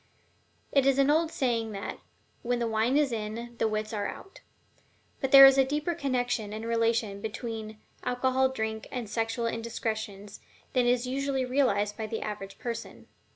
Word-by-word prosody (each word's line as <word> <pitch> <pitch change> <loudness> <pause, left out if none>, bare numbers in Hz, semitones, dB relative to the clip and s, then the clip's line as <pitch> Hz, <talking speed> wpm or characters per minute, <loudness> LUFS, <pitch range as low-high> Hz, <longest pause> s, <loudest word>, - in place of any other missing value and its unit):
It 275 -1 +3
is 275 -1 +4
an 275 +1 +4
old 320 +1 +2
saying 230 -6 -1
that 200 0 -5 0.4
"When 245 +1 0
the 235 - -1
wine 225 +4 +1
is 295 -3 +2
in, 230 +2 -5
the - - +2
wits 215 0 -3
are 205 -1 -1
out." 390 - -10 0.8
But 270 -2 -2
there 275 0 +12
is 270 0 +7
a - - +7
deeper 295 +5 -1
connection 245 -8 -1
and 220 +1 -5
relation 230 -3 0
between 220 -1 -5 0.3
alcoholic 260 +1 +1
drink 220 -1 -3
and 245 -4 -4
sexual 225 +2 -2
indiscretions 220 -3 -4 0.3
than 250 -2 +3
is 245 0 +2
usually 270 0 -1
realized 210 -6 +1
by 220 -1 -3
the 220 +1 -4
average 200 -2 -6
person. 230 -1 -6
235 Hz, 165 wpm, -28 LUFS, 220-265 Hz, 0.8 s, there